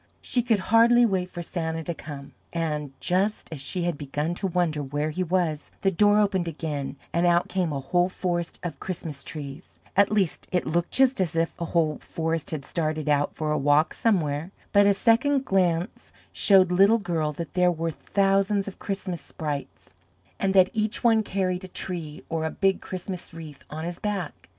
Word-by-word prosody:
She 245 - 0
could 230 -2 +2 0.2
hardly 235 +1 +7
wait 185 -4 0
for 175 - -6
Santa 165 -2 -3
to 170 - -3
come, 145 -3 -9 0.2
and 150 -4 -2
just 195 +4 0
as 145 - -7
she 175 +5 -2
had 175 -4 -1
begun 150 +3 -2
to 195 +2 -2
wonder 170 -4 0
where 145 +2 -2
he 185 - -3
was, 170 -4 0
the 195 - +3
door 205 +3 +4
opened 190 -4 +1
again 150 -4 -4 0.2
and 170 +1 +3
out 175 0 +3
came 180 -4 0
a 140 - -2
whole 175 +6 +1
forest 175 -2 -3
of 160 -6 -5
Christmas 160 -6 -5
trees, 145 +1 -8 0.2
at 200 0 +4
least 200 -6 0
it 180 - +1
looked 170 +2 0
just 265 -5 +3
as 175 -2 -1
if 165 0 +1
a - - 0
whole 160 -3 +1
forest 165 -1 -3
had 150 -4 -5
started 155 -2 -2
out 145 0 +1
for 155 -1 -2
a 150 - +1
walk 145 +3 +3
somewhere, 160 -7 0 0.2
but 205 0 +5
a 200 - +4
second 260 +6 +3
glance 180 -2 0 0.2
showed 190 -3 +5
Little 195 +5 +5
Girl 170 -7 -1
that 165 +3 -6
there 180 -1 +4
were 165 0 -2
thousands 195 +3 +1
of 200 - -8
Christmas 190 -3 -4
sprites, 145 -3 -6 0.5
and 195 0 +1
that 185 -1 +6
each 215 +1 -1
one 225 -2 +5
carried 185 -3 -1
a - - -6
tree 170 -5 -5
or 165 -1 -2
a - - 0
big 195 +2 +1
Christmas 180 -2 -6
wreath 155 -4 -10
on 155 +2 -5
his 175 0 -5
back. 200 -6 -4
175 Hz, 190 wpm, -26 LUFS, 155-195 Hz, 0.5 s, hardly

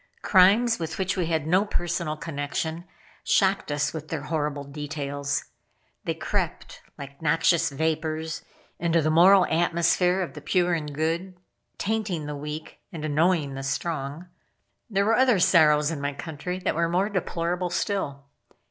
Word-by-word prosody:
Crimes, 210 +5 +5
with 160 -1 -4
which 190 0 -1
we 180 -4 -1
had 160 -3 0
no 180 +5 +3
personal 170 -5 -2
connection, 160 +1 -4 0.4
shocked 195 -5 +2
us 145 0 0
with 155 -1 -6
their 155 -3 -4
horrible 150 -2 -2
details. 145 -1 -3 0.6
They - - -1
crept, - - -3 0.2
like 140 +1 -10
noxious 165 +1 +3
vapors, 160 +1 -2 0.4
into 170 -1 +2
the 155 - +2
moral 180 +3 +7
atmosphere 175 +2 +2
of 175 - -7
the 150 - -9
pure 175 +2 +1
and 150 -3 -2
good; 165 +5 -2 0.4
tainting 200 -7 -2
the 150 0 -4
weak, 150 +2 -7
and 155 -2 -5
annoying 155 -1 +1
the 135 - -5
strong. 145 +3 -3 0.6
There 200 -2 +1
were 225 - +3
other 255 -4 +4
sorrows 155 -4 +4
in 150 -3 -4
my 145 0 -2
country 160 +4 -5
that 185 - -1
were 170 +1 0
more 185 +4 +1
deplorable 180 -2 -2
still. 170 -7 -2
165 Hz, 150 wpm, -26 LUFS, 150-180 Hz, 0.6 s, moral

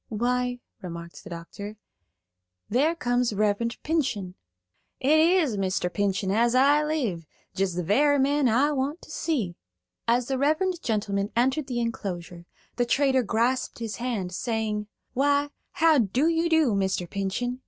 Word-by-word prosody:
"Why," 245 +2 0 0.2
remarked 170 -1 -8
the 205 - -10
doctor, 200 +5 -8 0.9
"there 290 +9 +2
comes 245 -5 0
Reverend 210 +3 0
Pinchen." 250 - -1 0.7
"It 295 +4 +4
is 320 - +3
Mr. 185 -2 -1
Pinchen 195 -1 0
as 235 +4 +2
I 285 +3 +5
live; 240 - -2 0.3
jest 190 -2 -1
the 180 - -1
very 285 - +3
man 280 -1 +2
I 265 +7 +3
want 285 +4 -2
to - - -12
see." 225 - -2 0.5
As 240 +1 +3
the 265 -1 -1
reverend 330 +5 +1
gentleman 205 -3 -1
entered 265 +4 +1
the 245 -2 -2
enclosure, 175 -7 -4 0.3
the 245 - +2
trader 265 0 +3
grasped 235 +3 0
his 225 -2 -5
hand, 230 -7 -3
saying: 215 0 -2 0.3
"Why, 285 +2 +2 0.2
how 325 -4 +4
do 245 - +2
you 335 0 +1
do, 320 -8 +3
Mr. 190 -2 0
Pinchen? 200 +7 -2
240 Hz, 145 wpm, -26 LUFS, 200-285 Hz, 0.9 s, I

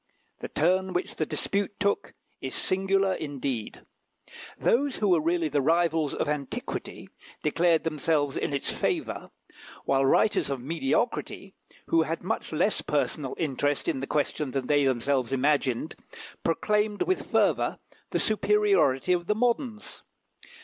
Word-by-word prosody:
The - - -5
turn 185 +4 +1
which 180 - -2
the 155 - -1
dispute 200 0 -1
took 200 0 0 0.3
is 130 - -4
singular 195 0 +1
indeed. 135 -8 -4 0.8
Those 275 +2 +2
who 210 - 0
were 175 -3 +4
really 165 +1 +1
the 145 -1 +1
rivals 165 0 +2
of - - -1
antiquity 145 -2 -4 0.3
declared 165 +2 +2
themselves 150 -2 0
in - - -1
its 140 -1 -1
favour, - - -2 0.6
while 135 0 +2
writers 140 +5 +3
of 135 -2 -2
mediocrity, 165 - -2 0.3
who 330 0 +3
had - - -2
much - - -3
less - - +1
personal - - -1
interest 145 -2 -1
in - - 0
the 135 - -4
question 150 -1 -1
than 130 0 -2
they 145 +1 +3
themselves 130 0 +1
imagined, 135 0 +1 0.5
proclaimed 210 +5 +1
with 375 - -1
fervour - - +2 0.3
the - - 0
superiority 215 - +2
of 175 -1 -1
the 210 - +2
moderns. 235 -1 -1
160 Hz, 135 wpm, -27 LUFS, 140-195 Hz, 0.8 s, were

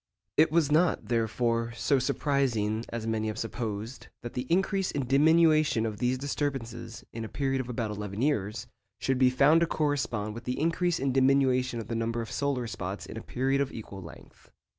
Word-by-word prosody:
It 155 0 +5
was 155 -3 +2
not, 160 -2 +2
therefore, 115 0 0
so 140 +3 +2
surprising 120 -5 0
as 115 -1 -4
many 110 -1 -1
have 110 0 -3
supposed, 115 0 -5 0.2
that 120 - -6
the 125 +1 -4
increase 195 +1 +1
and 140 -3 -2
diminution 155 -3 +4
of 110 -2 -4
these 125 +1 +1
disturbances, 135 -4 -4
in 115 - -5
a 110 - -6
period 135 -2 -1
of 125 - -8
about 115 -3 -2
eleven 105 -1 -5
years, 110 -7 0 0.3
should 130 -1 0
be 130 -1 +6
found 145 +6 +5
to 170 - +3
correspond 135 -10 -1
with 115 +1 -9
the 125 - -2
increase 170 +2 +1
and 135 -1 0
diminution 130 -2 +3
of 110 - -6
the 115 - -4
number 115 +1 -1
of 115 - -5
solar 140 -4 -1
spots 95 -3 -5
in - - -9
a 110 - -5
period 135 +4 0
of 140 - -1
equal 100 -3 -8
length. 85 -5 -14
125 Hz, 190 wpm, -28 LUFS, 115-140 Hz, 0.3 s, be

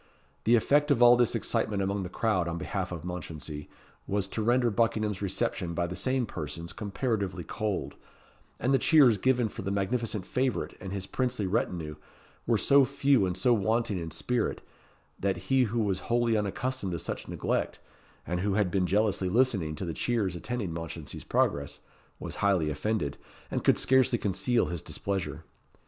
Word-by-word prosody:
The 115 - +6
effect 145 +6 +3
of 125 -4 +4
all 120 0 +9
this 120 -2 +2
excitement 100 -2 0
among 100 +1 -1
the 90 - -5
crowd 95 -3 0
on 85 0 -3
behalf 95 +1 -3
of 85 -2 -6
Mounchensey 80 -4 -6 0.4
was 100 -1 0
to 110 - -3
render 120 +1 +3
Buckingham's 105 -2 0
reception 90 -3 -1
by 85 - +1
the 90 +1 -5
same 130 +2 0
persons 85 -2 -6
comparatively 100 -3 -2
cold; 100 - -3 0.7
and 130 +3 +1
the 135 - +4
cheers 130 -8 +5
given 125 0 +2
for 110 - -7
the 100 - -3
magnificent 105 0 -1
favourite 125 - -1
and 95 0 -6
his 100 -1 -3
princely 125 -2 -1
retinue 85 -5 -1 0.5
were - - +3
so 140 0 +5
few 135 -5 +2
and 90 0 -3
so 120 +6 +4
wanting 110 -1 +1
in 85 -1 -5
spirit, 120 +6 -1 0.6
that 95 -2 0
he 130 +7 +2
who 115 +1 -1
was 100 -3 0
wholly 120 -1 +1
unaccustomed 105 0 -2
to - - -1
such - - -5
neglect, - - -2 0.5
and 90 +1 -2
who 100 +1 0
had 100 -4 +1
been 95 -1 +1
jealously 100 -2 +1
listening 100 -9 +2
to 95 - -4
the 85 - -3
cheers 105 -3 0
attending 100 -1 -3
Mounchensey's 80 -2 -6
progress, 70 0 0 0.4
was - - -6
highly 95 -7 +2
offended, 75 -2 -2 0.3
and - - -1
could - - +4
scarcely 130 -2 +3
conceal 105 +4 +1
his 85 -3 -4
displeasure. 100 -3 -4
100 Hz, 170 wpm, -29 LUFS, 90-120 Hz, 0.7 s, all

